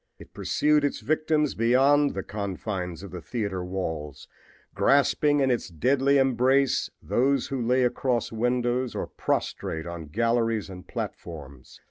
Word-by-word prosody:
It - - -15
pursued 150 0 +2
its 145 - 0
victims 155 +3 +1
beyond 135 +5 +3
the 95 - -3
confines 95 -3 -4
of 100 - -9
the 90 -1 -7
theater 100 -2 -3
walls, 80 -6 -5 0.5
grasping 145 +1 +3
in 135 -1 +3
its 120 -6 -1
deadly 135 - +2
embrace 130 +1 +2
those 135 +1 +1
who 135 -2 -2
lay 125 +2 +2
across 125 -1 0
windows 125 +2 0
or - - -2
prostrate 80 0 -3
on 85 -2 -7
galleries 115 +2 0
and 90 -1 -10
platforms. 70 -6 -7
120 Hz, 135 wpm, -26 LUFS, 95-135 Hz, 0.5 s, beyond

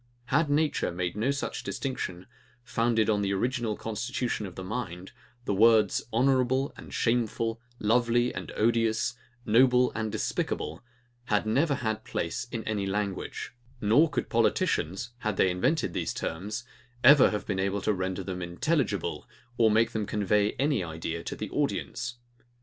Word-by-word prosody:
Had 165 -3 +3
nature 150 - +1
made 90 +1 -3
no 110 +5 0
such 140 0 -2
distinction, 95 -9 -4 0.4
founded 115 -2 +1
on 105 -2 +2
the 100 -1 0
original 120 0 -1
constitution 115 0 -3
of 90 - -11
the 95 - -6
mind, 95 -3 -5 0.3
the - - 0
words, 110 0 +5
HONOURABLE 130 +2 +2
and - - -11
SHAMEFUL, 115 -1 0 0.2
LOVELY 120 +2 +2
and - - -6
ODIOUS, 115 +1 +2 0.3
NOBLE 125 +2 +5
and 110 -1 -2
DESPICABLE, 90 -5 -2 0.4
had 105 -3 +1
never 140 +7 +2
had 110 -3 -2
place 85 +6 -3
in 115 -2 -3
any 105 -3 -2
language; 100 +2 -3 0.3
nor 120 +10 +4
could - - -2
politicians, 95 +9 +1
had 110 -4 -2
they 95 - +4
invented 120 - 0
these - - -2
terms, 105 +8 -4 0.4
ever 140 +2 +8
have 105 - -3
been 95 -3 -2
able 100 +1 0
to 105 - +1
render 95 0 -2
them 90 -1 -5
intelligible, 120 - -1 0.3
or 115 -1 +6
make 110 +2 +3
them 110 -2 -2
convey 105 0 +1
any 140 -6 +1
idea 80 0 -4
to - - -4
the - - -6
audience. 120 - -2
110 Hz, 150 wpm, -28 LUFS, 100-120 Hz, 0.4 s, ever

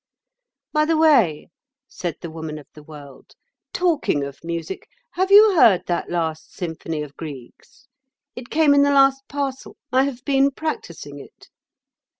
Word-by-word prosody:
"By 305 0 +3
the 320 0 +1
way," 245 - +3 0.4
said 175 -4 -5
the 170 - -7
Woman 160 -1 -6
of 150 - -12
the 150 - -13
World, 145 -3 -14 0.4
"talking 325 - 0
of 140 0 -9
music, 170 +2 -5 0.2
have 375 +2 -1
you 410 0 +7
heard 215 - +5
that 175 - -2
last 160 -2 -3
symphony 160 -3 -5
of 145 -1 -11
Grieg's? 150 - -11 0.5
It 245 -1 -9
came 310 -2 +3
in 285 - +5
the 285 - +3
last 270 -1 +4
parcel. 275 -2 -5 0.2
I 260 +1 +4
have 255 -3 -6
been 275 -1 +3
practising 170 - -6
it." - - -16
195 Hz, 150 wpm, -21 LUFS, -, 0.5 s, you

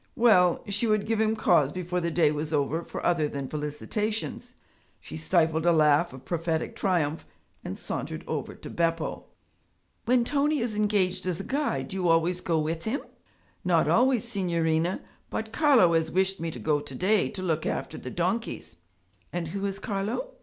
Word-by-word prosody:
Well! 210 -8 +4
she 205 +3 0
would 215 -1 +2
give 225 0 0
him 220 0 +2
cause 160 -9 +3
before 180 0 -2
the 170 - 0
day 160 -3 +3
was 150 +1 -3
over 150 +2 0
for - - -6
other 165 -3 +2
than 140 -2 -4
felicitations. 155 +10 -3 0.4
She - - -10
stifled 160 0 +2
a 175 - +4
laugh 155 +1 +4
of 130 0 -12
prophetic 165 -1 -2
triumph 165 -5 0 0.4
and - - -5
sauntered - - -5
over - - -4
to - - -10
Beppo. 165 -1 -1 0.8
'When 245 0 +4
Tony 295 +3 +1
is 235 -4 -2
engaged 190 -3 +1
as 175 -3 -1
a - - -4
guide 285 +5 -1
do 195 - -5
you 180 -2 0
always 170 +2 +2
go 165 -2 0
with 160 +1 -2
him?' 240 +6 -1 0.6
'Not - - +3
always, 250 -1 +3
signorina, 170 -6 0 0.3
but 220 0 -4
Carlo 260 - +5
has 160 -1 +2
wished 190 +2 +1
me 165 0 -2
to - - -7
go 150 -1 +1
to 145 -2 -7
day 200 +6 +2
to 195 -3 -6
look 160 -3 0
after - - -3
the - - -7
donkeys.' - - -2 0.5
'And 170 -2 -3
who 195 +3 -4
is 195 0 -4
Carlo?' 210 - -3
180 Hz, 180 wpm, -27 LUFS, 160-215 Hz, 0.8 s, Carlo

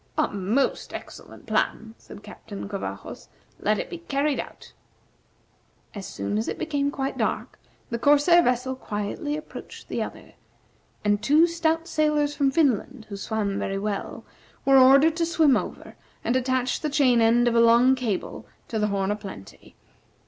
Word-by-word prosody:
"A - - +2
most 205 +7 -1
excellent - - -10
plan," 225 0 -1
said 205 - -13
Captain 205 -1 -9
Covajos; 200 -1 -6 0.3
"let - - +1
it - - -3
be 350 - -8
carried 290 -3 -1
out." - - -9 1.2
As 200 -3 -7
soon 100 +1 -3
as 110 - -3
it - - -3
became 290 -3 -1
quite 275 -1 -4
dark, - - -2 0.3
the 235 - -2
corsair 295 +6 +5
vessel 250 -2 0
quietly 235 +6 -4
approached 305 - -10
the - - -2
other, - - -7 0.7
and 205 0 +2
two 300 +8 +5
stout 330 -1 0
sailors 300 -2 +1
from 280 -2 +2
Finland, 265 -4 0
who 200 - -5
swam 200 0 -2
very 195 - -2
well, 200 0 -4 0.4
were 270 -1 +6
ordered 275 +5 +6
to 340 - +1
swim 320 -5 +4
over - - -5 0.3
and 240 - 0
attach 255 0 0
the 305 - -2
chain 260 -5 +3
end 235 +2 +4
of 240 - +2
a 230 - +4
long 235 +3 +6
cable 240 -7 -3 0.2
to 220 - -2
the 210 - +1
"Horn 200 -1 -1
o' - - 0
Plenty." 195 - -11
255 Hz, 165 wpm, -25 LUFS, 210-290 Hz, 1.2 s, were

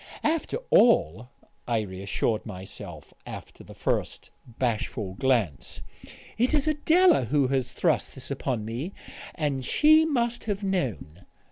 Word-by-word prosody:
"After 325 +7 0
all," 120 - +4 0.4
I 115 -2 +1
reassured 100 +2 -2
myself, 95 -5 -9
after - - -10
the - - -13
first - - -2 0.2
bashful 115 -4 -2
glance, 115 - -1 0.6
"it 250 +6 +3
is 295 0 +1
Adela 315 - +4
who 140 +1 +1
has 135 -3 0
thrust - - 0
this - - -7
upon 115 -5 -2
me; 125 - -5 0.4
and 145 -5 -1
she 310 - +5
must 240 -6 -1
have 205 -2 -2
known." 125 - -3
130 Hz, 125 wpm, -26 LUFS, -, 0.6 s, she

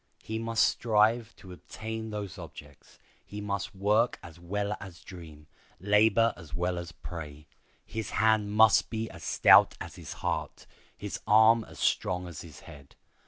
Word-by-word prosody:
He 110 0 -4
must 115 0 +1
strive 115 +1 +1
to 95 - -14
attain 110 +4 -7
those 105 -5 -6
objects. - - -13 0.3
He 105 - -9
must 100 -1 -4
work 105 +5 +2
as 85 -1 -12
well 100 +4 -3
as 95 -3 -11
dream, 80 -5 -12 0.3
labor 110 +3 +3
as 80 -4 -11
well 90 +1 -1
as 85 0 -8
pray. 75 -3 -9 0.4
His 110 -2 -5
hand 110 -1 +2
must 110 0 +5
be 110 -1 -4
as - - -12
stout - - +5
as - - -8
his - - -8
heart, - - -3 0.3
his 105 -1 -6
arm 110 +1 +6
as - - -14
strong 90 0 0
as 85 -3 -8
his 80 -4 -12
head. 70 -1 -14
105 Hz, 160 wpm, -29 LUFS, 90-110 Hz, 0.4 s, arm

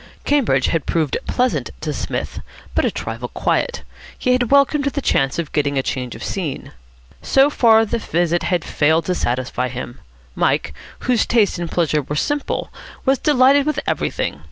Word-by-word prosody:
Cambridge 230 - +2
had 165 -3 -1
proved 160 -4 0
pleasant 250 0 0
to - - -2
Psmith, - - -4 0.3
but - - +2
a - - +3
trifle - - -5
quiet. 485 - -1 0.3
He 250 - 0
had 250 -2 +2
welcomed 280 +1 +4
the 280 0 -1
chance 135 - +1
of 170 -3 -3
getting 145 -2 0
a 135 - +1
change 125 -3 -3
of - - -9
scene. 170 -8 -4 0.5
So 275 +2 +4
far 225 -4 +5
the 230 +2 -2
visit 175 -3 0
had 175 -2 -1
failed 160 +2 +2
to 180 - 0
satisfy 125 -4 -1
him. 125 0 -7 0.3
Mike, - - 0 0.3
whose 245 -2 +1
tastes 215 -6 +2
in 175 - -3
pleasure 160 -3 +1
were 145 +2 -5
simple, 290 - -2 0.3
was 270 0 +3
delighted 280 0 +4
with 300 -3 0
everything. - - -2
180 Hz, 170 wpm, -20 LUFS, -, 0.5 s, far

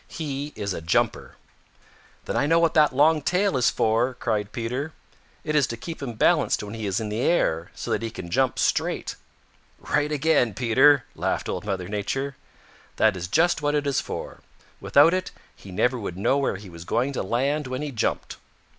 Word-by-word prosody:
"He 145 -2 -5
is 100 -2 -3
a - - -5
jumper." 80 +2 0 0.9
"Then - - -3
I 145 - +2
know 165 +2 +4
what 165 -1 +3
that 150 -2 +5
long 150 +4 +4
tail 180 +3 +1
is 125 -2 +3
for," 115 +4 +1
cried 105 -3 -2
Peter. 125 +7 -4 0.5
"It 155 0 -2
is 145 -3 +4
to 115 - -5
keep 165 +7 -7
him 130 -4 -4
balanced 110 - +2
when 105 0 -7
he 110 -2 -4
is 95 -1 0
in 110 -1 -4
the 105 +2 -3
air 85 - +1
so - - -5
that - - 0
he 115 - -3
can 85 -5 -8
jump 130 +2 +1
straight." - - 0 0.6
"Right 150 0 -1
again, 145 -7 +2
Peter," 130 +4 +4
laughed - - -2
Old - - -4
Mother 95 -3 -3
Nature. 130 +7 -3 0.6
"That 110 -2 +3
is 90 -1 -5
just 165 - +2
what 145 0 +1
it 145 0 0
is 140 -2 +1
for. - - -7 0.4
Without 150 +5 +5
it, 185 0 -1 0.3
he 100 - -13
never 125 +6 +1
would 95 -4 -5
know 135 +8 +2
where 135 - 0
he 100 +1 -10
was 85 0 -10
going 130 +9 0
to - - -2
land 135 +8 -1
when 130 +3 -4
he 150 - -4
jumped. 115 - -2
130 Hz, 200 wpm, -24 LUFS, 105-150 Hz, 0.9 s, that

